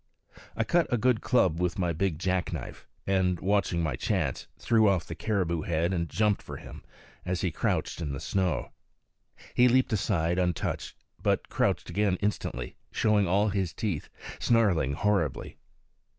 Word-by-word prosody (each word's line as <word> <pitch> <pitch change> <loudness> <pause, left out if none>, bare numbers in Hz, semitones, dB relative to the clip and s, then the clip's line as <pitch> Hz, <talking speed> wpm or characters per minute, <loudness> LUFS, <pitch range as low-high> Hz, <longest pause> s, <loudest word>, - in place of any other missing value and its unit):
I 115 - +2
cut 170 +9 +1
a 120 - +3
good 120 -1 +2
club 90 -10 +2
with 90 -1 0
my 90 -3 0
big 85 0 -1
jack 90 +1 -1
knife, - - -7 0.2
and, 95 -3 +1
watching 95 -3 +1
my 75 -6 -1
chance, - - -1
threw 110 -3 +3
off 90 -4 +1
the - - -6
caribou 90 -4 -1
head 85 +3 0
and 85 -3 -1
jumped 105 -2 +1
for - - -8
him - - -11 0.4
as 90 0 -2
he 90 - 0
crouched 85 - -1
in 75 -3 -2
the 70 - -4
snow. 90 -7 -1 0.8
He 125 - +5
leaped 125 -1 +3
aside 90 -4 +1
untouched, 90 -3 -1 0.3
but - - 0
crouched - - 0
again 95 +2 +1
instantly, 100 -11 -3
showing 105 -3 +2
all 100 +4 +3
his 95 -4 -2
teeth, 100 -10 -3 0.3
snarling 100 - +2
horribly. 90 -3 0
95 Hz, 160 wpm, -28 LUFS, 85-105 Hz, 0.8 s, He